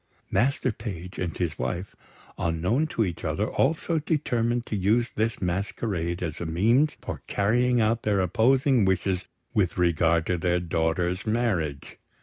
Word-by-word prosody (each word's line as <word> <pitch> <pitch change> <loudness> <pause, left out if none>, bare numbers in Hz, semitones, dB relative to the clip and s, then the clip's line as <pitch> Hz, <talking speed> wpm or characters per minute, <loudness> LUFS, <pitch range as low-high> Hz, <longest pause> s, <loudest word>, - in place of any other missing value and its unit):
Master 130 +4 +2
Page 95 -5 -7
and 85 -3 -3
his 85 -4 -2
wife, 90 +2 -3 0.4
unknown 90 - 0
to 115 -7 0
each 85 -3 -5
other, - - -1
also 160 +3 +1
determined 120 -6 0
to - - -3
use 110 +5 +2
this 110 +1 -1
masquerade 90 -1 -2
as 80 -1 -4
a - - -2
means 115 - +2
for - - -5
carrying 120 +4 +2
out 115 +2 +2
their 105 -2 +1
opposing 125 - +3
wishes 95 -1 0 0.3
with 95 -5 +1
regard 85 -1 +2
to 90 -1 0
their 90 +1 +1
daughter's 85 +3 -1
marriage. 95 - -1
100 Hz, 145 wpm, -26 LUFS, 85-120 Hz, 0.4 s, opposing